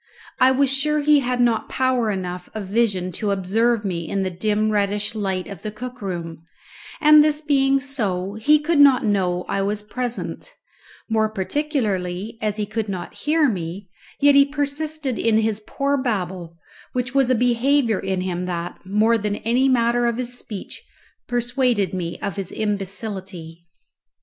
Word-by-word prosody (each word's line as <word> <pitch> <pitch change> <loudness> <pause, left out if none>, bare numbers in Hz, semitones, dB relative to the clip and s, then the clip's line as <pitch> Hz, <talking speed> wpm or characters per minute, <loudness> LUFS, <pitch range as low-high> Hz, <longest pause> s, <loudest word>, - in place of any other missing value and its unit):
I 255 - +6
was 270 0 +3
sure 300 +2 +1
he 295 0 +5
had 250 -2 -1
not 235 -2 +2
power 255 -3 +1
enough 180 -2 -4
of 215 -2 -4
vision 195 -3 0
to 205 +4 -3
observe 210 +4 +1
me 170 -4 -3
in 195 -1 -1
the 185 - -2
dim 215 +4 0
reddish 205 0 0
light 195 -4 -2
of 200 - -9
the 215 - -4
cook 250 +3 -8
room, 170 -4 -5 0.6
and 300 -1 +7
this 300 0 +1
being 275 -2 +3
so, 205 -9 -2
he 255 +9 +4
could 300 +1 0
not 275 -4 +6
know 180 -4 0
I 195 - -1
was 205 +1 -1
present, 245 - -5 0.5
more 220 -1 +1
particularly 215 - -2
as 210 -1 -1
he 210 - -1
could 215 0 -3
not 180 -3 -5
hear 305 0 +2
me, 185 -2 -4 0.3
yet 285 0 +6
he 280 0 +7
persisted 290 -1 -2
in 225 -1 +3
his 220 -1 0
poor 280 0 0
babble, 185 -8 -3 0.4
which 250 0 -2
was 270 -2 +3
a 255 - +4
behaviour 245 0 +2
in 190 -1 -2
him 180 -1 -3
that, 175 -1 -4
more 215 +4 +2
than 210 -1 -2
even 230 +2 -2
the 260 +2 +3
matter 240 -1 +2
of 235 -1 -1
his 245 -1 -2
speech, 210 -5 -6 0.5
persuaded 240 -4 0
me 175 -2 -3
of 195 - -4
his 195 -2 -4
imbecility. 195 -5 -5
220 Hz, 170 wpm, -22 LUFS, 190-255 Hz, 0.6 s, and